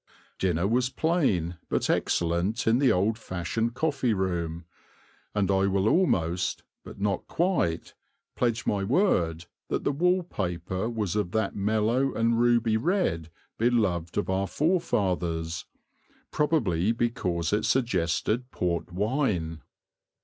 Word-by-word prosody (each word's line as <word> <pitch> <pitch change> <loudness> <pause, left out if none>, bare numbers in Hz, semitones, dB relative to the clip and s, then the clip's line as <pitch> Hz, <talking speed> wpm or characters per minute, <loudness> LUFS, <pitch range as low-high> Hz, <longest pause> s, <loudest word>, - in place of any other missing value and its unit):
Dinner 90 -1 +1
was 125 +3 +1
plain 105 - 0
but - - 0
excellent 85 +7 0
in 115 +2 +3
the 135 -2 +4
old 105 +5 +1
fashioned 110 +5 -2
coffee 135 -8 0
room, 85 -3 -2 0.7
and 100 -2 +2
I 95 0 +3
will 100 +1 +1
almost, 90 - +1 0.2
but - - -11
not 100 0 -1
quite, 165 - 0 0.4
pledge 120 0 0
my 100 -1 0
word 90 - +1 0.2
that - - -2
the - - +1
wall 180 +5 +2
paper 95 - -3
was 105 -5 -2
of 100 -4 -1
that 110 -3 0
mellow 110 +6 +1
and 115 0 +2
ruby 120 -2 +3
red 115 - 0 0.3
beloved 105 -8 +1
of 105 - 0
our 95 +1 0
forefathers, 90 - 0 0.6
probably 115 - +1
because 100 -8 -1
it 105 +1 +1
suggested 110 +1 0
port 90 -3 -2
wine. 95 - -1
105 Hz, 125 wpm, -27 LUFS, 90-120 Hz, 0.7 s, the